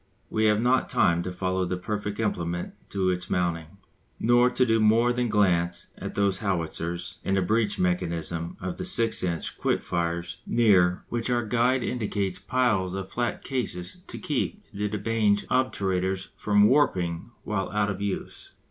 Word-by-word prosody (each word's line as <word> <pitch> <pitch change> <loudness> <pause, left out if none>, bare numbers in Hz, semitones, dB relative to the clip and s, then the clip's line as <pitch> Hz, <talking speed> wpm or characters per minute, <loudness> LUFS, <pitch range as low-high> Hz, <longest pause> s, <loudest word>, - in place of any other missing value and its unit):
We 110 0 +2
have 105 0 +4
not 125 +3 +2
time 85 -9 +3
to 90 - -4
follow 95 0 -1
the 90 0 -2
perfect 105 +2 -4
implement 85 -5 -2 0.2
to 95 -2 0
its 90 0 -3
mounting, 85 0 -1 0.4
nor 120 +2 +4
to 125 +1 +2
do 115 -1 +3
more 115 +3 +4
than 125 -1 0
glance 85 -5 +1
at - - -7
those 100 -2 +1
howitzers 85 -3 -3
and 95 0 +1
the 95 - +2
breech 110 +2 +1
mechanism 85 -2 -1
of 90 -1 -4
the - - -4
6 115 -11 +2
inch 85 -4 -2
quick - - 0
firers 85 0 -2
near 95 -6 +4
which 120 +1 -2
our 120 -2 +1
guide 120 +3 +2
indicates 100 -5 -2
piles 110 -8 +1
of 95 -1 -5
flat 120 -1 -2
cases 90 -10 -4
to - - -6
keep - - -2
the 105 +1 -1
de 105 - -2
Bange 105 -1 +1
obturators 95 -7 0
from 105 -1 +3
warping 90 - +1
while 95 -3 -2
out 105 -1 0
of 100 0 -6
use. 100 -1 -4
100 Hz, 165 wpm, -26 LUFS, 90-115 Hz, 0.4 s, have